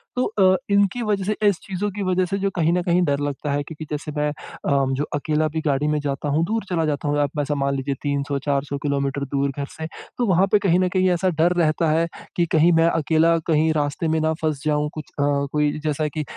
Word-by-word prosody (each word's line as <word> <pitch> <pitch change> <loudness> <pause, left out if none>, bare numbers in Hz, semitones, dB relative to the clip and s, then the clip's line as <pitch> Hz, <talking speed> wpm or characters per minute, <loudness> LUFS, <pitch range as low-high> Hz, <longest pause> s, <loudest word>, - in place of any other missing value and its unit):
तो 250 - +1
अ, 190 -3 +3 0.2
इनकी 200 +4 +2
वजह 205 -2 0
से 210 +2 0
इस 200 -4 +3
चीजों 195 +2 -3
की 205 +1 -4
वजह 185 0 +1
से 195 +3 -2
जो 195 0 0
कहीं 165 -1 +2
न 180 - +1
कहीं 175 +1 +2
डर 140 -2 0
लगता 145 0 -3
है 145 +1 0
क्योंकि 155 +1 -8
जैसे 150 0 -4
मैं 150 0 +1
अ, 140 -2 -2
जो 140 +2 -1
अकेला 155 +1 0
भी 160 +1 -3
गाड़ी 145 +1 +1
में 150 0 +1
जाता 145 0 -3
हूँ, 155 +3 +2
दूर 220 +4 -1
चला 165 -3 0
जाता 150 -1 -2
हूँ, 145 0 +1
आप 145 +1 -1
ऐसा 145 +1 -1
मान 140 0 0
लीजिए 135 +1 -2
300-400 140 0 -1
किलोमीटर 140 -1 -1
दूर 140 0 -1
घर 140 - -2
से, 160 0 -4 0.3
तो 245 - +1
वहाँ 190 0 +3
पे 210 - +5
कहीं 185 -3 +2
न 185 0 +2
कहीं 185 0 +3
ऐसा 180 +2 +1
डर 175 +2 +4
रहता 160 +1 +2
है 165 +2 +2 0.3
कि 175 - +2
कहीं 165 +2 +5
मैं 165 - +4
अकेला 165 +1 +2
कहीं 160 -1 +3
रास्ते 145 +2 -1
में 160 0 +1
ना 160 0 +1
फँस 155 -3 -1
जाऊँ, 150 0 +1
कुछ 155 -2 -6
अ, - - +3 0.3
कोई 150 -1 +2
जैसा 155 0 0
कि 155 +1 -3
155 Hz, 240 wpm, -22 LUFS, 145-180 Hz, 0.3 s, पे